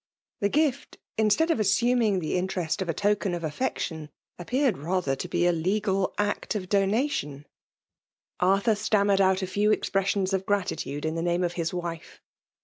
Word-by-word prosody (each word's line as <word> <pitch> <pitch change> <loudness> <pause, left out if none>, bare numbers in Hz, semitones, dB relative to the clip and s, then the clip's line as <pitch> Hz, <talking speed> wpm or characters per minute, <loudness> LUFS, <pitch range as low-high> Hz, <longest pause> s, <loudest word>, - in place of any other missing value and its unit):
The 200 - +1
gift, 295 +1 0 0.2
instead 220 +10 +3
of 285 - 0
assuming 215 -2 +2
Ae - - -1
interest 180 -1 -1
of 185 - -3
a - - +1
token 205 -2 +1
of 170 - -6
affection, 160 - -3 0.3
appeared 250 - 0
rather 165 -3 -1
to 135 - -5
be 175 - 0
a 175 - +4
legal 190 +3 0
act 205 +1 -1
of 185 -3 -4
donation^ 195 - 0 0.9
Arthur 195 +5 +3
stammered 205 -2 +2
out 190 0 +3
a - - +1
few 205 +3 +1
expressions 195 -1 0
of 190 0 -1
gratitude 160 -7 -2
m 160 - -1
the 165 - -2
name 175 +1 0
of 175 -1 -1
his 170 -2 -2
wife. 170 -2 -6
190 Hz, 165 wpm, -26 LUFS, 175-210 Hz, 0.9 s, a